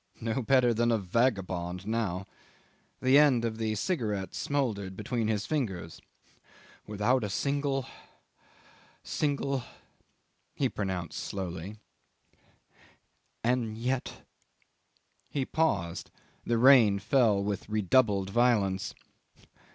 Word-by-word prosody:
"No 115 Hz, +3 st, -1 dB
better 125 Hz, 0 st, +3 dB
than 120 Hz, +1 st, +2 dB
a 115 Hz, -, +3 dB
vagabond 95 Hz, -4 st, -1 dB
now"... 105 Hz, -4 st, -2 dB, 0.8 s
the 130 Hz, +2 st, +6 dB
end 130 Hz, -6 st, +4 dB
of 110 Hz, -1 st, -3 dB
the 110 Hz, -1 st, -1 dB
cigarette 105 Hz, -, -2 dB
smouldered 105 Hz, -10 st, -2 dB
between 110 Hz, +1 st, -2 dB
his 105 Hz, -2 st, -1 dB
fingers... 100 Hz, -, -3 dB, 0.9 s
"without 105 Hz, +4 st, +1 dB
a 105 Hz, -, -2 dB
single 140 Hz, +3 st, -1 dB, 1.2 s
single," 140 Hz, -3 st, -1 dB, 0.9 s
he -, -, +1 dB
pronounced 95 Hz, -4 st, -4 dB
slowly; 95 Hz, +1 st, -5 dB, 1.7 s
"and 115 Hz, -2 st, 0 dB
yet.. 125 Hz, +2 st, -3 dB, 0.5 s
." -, -, -43 dB, 0.2 s
He 140 Hz, -3 st, -2 dB
paused; 95 Hz, -, -1 dB, 0.4 s
the 120 Hz, -, +2 dB
rain 120 Hz, -5 st, +6 dB
fell 110 Hz, -3 st, +2 dB
with 100 Hz, 0 st, -3 dB
redoubled 105 Hz, -2 st, +2 dB
violence. 105 Hz, -5 st, +1 dB
110 Hz, 100 wpm, -29 LUFS, 100-130 Hz, 1.7 s, the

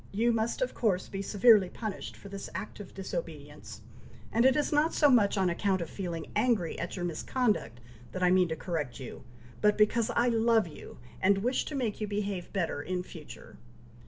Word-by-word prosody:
you 230 Hz, +4 st, +2 dB
must, 230 Hz, -, 0 dB
of -, -, -3 dB
course, 190 Hz, -6 st, 0 dB
be 195 Hz, -, -5 dB
severely 205 Hz, -1 st, +5 dB
punished 215 Hz, -1 st, -6 dB
for -, -, -12 dB
this 200 Hz, 0 st, -7 dB
act 195 Hz, +4 st, -6 dB
of 205 Hz, -, -9 dB
disobedience, 150 Hz, -, -7 dB, 0.5 s
and 230 Hz, +2 st, +3 dB
it 265 Hz, 0 st, +6 dB
is 295 Hz, -, 0 dB
not 300 Hz, +2 st, +2 dB
so 295 Hz, -3 st, +5 dB
much 210 Hz, -4 st, +4 dB
on 190 Hz, -1 st, +2 dB
account 190 Hz, +2 st, +1 dB
of 170 Hz, -, -4 dB
feeling 175 Hz, -4 st, -4 dB
angry 215 Hz, -6 st, +1 dB
at 170 Hz, -, -4 dB
your 175 Hz, -2 st, -3 dB
misconduct 190 Hz, -, -1 dB, 0.3 s
that 185 Hz, -, -3 dB
I 180 Hz, -, +5 dB
mean 185 Hz, -1 st, +4 dB
to 160 Hz, -, -3 dB
correct 160 Hz, -7 st, -4 dB
you, 130 Hz, -1 st, -8 dB, 0.4 s
but 210 Hz, 0 st, +4 dB
because 215 Hz, +2 st, +3 dB
I 240 Hz, -, +3 dB
love 225 Hz, -3 st, +3 dB
you, 155 Hz, -, -11 dB, 0.2 s
and 195 Hz, +1 st, +3 dB
wish 250 Hz, +2 st, 0 dB
to 300 Hz, -, -5 dB
make 230 Hz, -6 st, -2 dB
you 215 Hz, -, -1 dB
behave 200 Hz, -3 st, -3 dB
better 170 Hz, -6 st, -1 dB
in 180 Hz, +3 st, -3 dB
future. 160 Hz, -4 st, -12 dB
200 Hz, 195 wpm, -30 LUFS, 175-225 Hz, 0.5 s, it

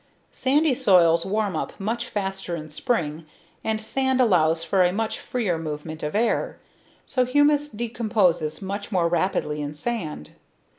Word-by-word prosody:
Sandy 290 Hz, +2 st, +2 dB
soils 170 Hz, -7 st, +4 dB
warm 205 Hz, -2 st, 0 dB
up -, -, -4 dB
much 235 Hz, +4 st, -2 dB
faster 195 Hz, -3 st, -3 dB
in 155 Hz, -2 st, -8 dB
spring 155 Hz, -, -2 dB, 0.4 s
and 220 Hz, 0 st, -1 dB
sand 265 Hz, +4 st, 0 dB
allows 165 Hz, -8 st, +3 dB
for 185 Hz, +3 st, +2 dB
a 180 Hz, -, +3 dB
much 220 Hz, +3 st, -2 dB
freer 205 Hz, -10 st, -2 dB
movement 155 Hz, 0 st, -6 dB
of 150 Hz, +4 st, -3 dB
air, 230 Hz, +2 st, 0 dB, 0.5 s
so 255 Hz, -, +1 dB
humus 290 Hz, +3 st, +3 dB
decomposes 210 Hz, -, 0 dB
much 200 Hz, +3 st, -5 dB
more 180 Hz, -4 st, +2 dB
rapidly 165 Hz, -3 st, 0 dB
in 145 Hz, +1 st, -5 dB
sand. 155 Hz, -, -4 dB
195 Hz, 145 wpm, -24 LUFS, 165-235 Hz, 0.5 s, soils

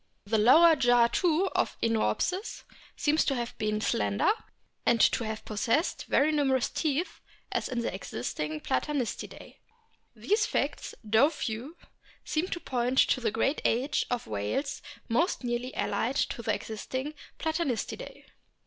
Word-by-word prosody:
The 220 Hz, +2 st, +1 dB
lower 320 Hz, +9 st, +7 dB
jaw 245 Hz, -3 st, +5 dB
too 340 Hz, +8 st, +2 dB
of -, -, 0 dB
Iniopsis 230 Hz, -, 0 dB, 0.3 s
seems 305 Hz, +1 st, +2 dB
to 275 Hz, -, +1 dB
have 240 Hz, -1 st, -4 dB
been 215 Hz, 0 st, 0 dB
slender, 100 Hz, -, +1 dB, 0.5 s
and 235 Hz, -, +3 dB
to 230 Hz, -, +4 dB
have 220 Hz, 0 st, -5 dB
possessed 230 Hz, -, 0 dB
very 295 Hz, +3 st, +3 dB
numerous 270 Hz, -4 st, +2 dB
teeth 315 Hz, +3 st, -1 dB, 0.3 s
as -, -, -1 dB
in 245 Hz, -3 st, -1 dB
the 230 Hz, -, -2 dB
existing 150 Hz, -2 st, -4 dB
Platanistidae. 275 Hz, -2 st, -3 dB, 0.6 s
These 420 Hz, +2 st, +1 dB
facts, -, -, -2 dB
though 220 Hz, +7 st, +4 dB
few, 270 Hz, +1 st, -5 dB, 0.5 s
seem 310 Hz, +4 st, -1 dB
to 345 Hz, -, -4 dB
point 250 Hz, -3 st, -1 dB
to 255 Hz, -, +1 dB
the 230 Hz, -, +1 dB
great 270 Hz, +7 st, 0 dB
age 255 Hz, +6 st, +1 dB
of 245 Hz, -1 st, -2 dB
whales 110 Hz, -, -2 dB, 0.3 s
most 260 Hz, -, +1 dB
nearly 245 Hz, +1 st, -2 dB
allied 250 Hz, +4 st, -1 dB
to 240 Hz, -, -1 dB
the 225 Hz, -, 0 dB
existing 260 Hz, +6 st, -5 dB, 0.2 s
Platanistidae. 320 Hz, -7 st, -3 dB
250 Hz, 140 wpm, -29 LUFS, 225-300 Hz, 0.6 s, lower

